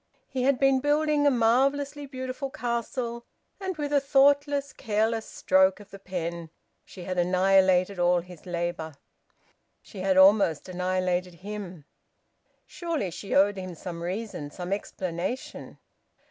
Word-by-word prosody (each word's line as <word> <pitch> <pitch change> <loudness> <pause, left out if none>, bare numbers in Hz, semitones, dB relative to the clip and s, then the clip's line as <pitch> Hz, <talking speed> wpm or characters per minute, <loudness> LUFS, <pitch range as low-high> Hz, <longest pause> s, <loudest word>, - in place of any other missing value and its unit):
He 260 - -3
had 265 +1 +3
been 270 0 +3
building 295 +1 +2
a - - +7
marvellously 275 +4 +1
beautiful 260 +1 -5
castle, 235 0 -3 0.4
and 380 -3 -4
with 295 -1 -3
a 285 - +5
thoughtless, 280 0 +3
careless 220 0 -1
stroke 190 +1 +2
of 205 0 -15
the 195 - -10
pen 170 -3 -5 0.3
she 185 - -11
had 185 0 -2
annihilated 185 +1 +3
all 175 0 +3
his 180 0 -14
labour; 170 -3 -3 0.8
she 205 - -12
had 190 0 +1
almost 190 -5 +5
annihilated 180 -1 -1
him. 190 -7 -7 0.8
Surely 325 - -3
she 195 +4 -4
owed 200 +1 +4
him 185 -2 -6
some 170 0 -7
reason, 180 -4 -4
some 180 +4 -4
explanation! 190 +3 -5
200 Hz, 130 wpm, -27 LUFS, 180-265 Hz, 0.8 s, a